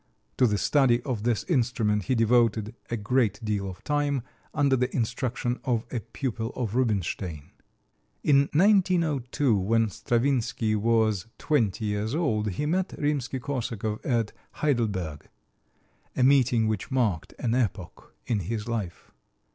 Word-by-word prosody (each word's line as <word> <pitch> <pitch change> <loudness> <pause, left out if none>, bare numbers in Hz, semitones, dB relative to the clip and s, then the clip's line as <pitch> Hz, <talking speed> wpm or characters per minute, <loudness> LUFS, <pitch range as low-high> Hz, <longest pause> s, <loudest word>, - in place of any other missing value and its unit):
To 125 - +5
the 105 -2 +1
study 125 +2 +3
of 125 -6 -3
this 115 -1 0
instrument 115 - +1
he 130 - +1
devoted 115 -2 +2 0.2
a 120 - -1
great 110 -1 +1
deal 100 -2 -1
of 90 0 -10
time, 145 -3 0 0.3
under 140 -3 +2
the 125 0 0
instruction 120 +1 -1
of 120 -2 0
a 120 - -1
pupil 115 0 -4
of 115 -5 -3
Rubinstein. 95 - -1 0.7
In 140 -1 +4
1902, 160 - +3
when 110 +3 +2
Stravinsky 120 -2 0
was 110 -2 +1
twenty 115 -8 0
years 105 +4 -1
old, 110 -11 0
he 100 +10 -3
met 185 +4 0
Rimsky 145 -3 -1
Korsakov 115 -5 -3
at 115 -5 0 0.2
Heidelberg 100 - -1 0.9
a 130 - +2
meeting 125 -4 +4
which 110 -3 -2
marked 115 - 0
an 115 -2 -1
epoch 120 -6 -3
in 115 -4 0
his 105 +4 -4
life. 105 -7 -4
115 Hz, 135 wpm, -27 LUFS, 105-130 Hz, 0.9 s, To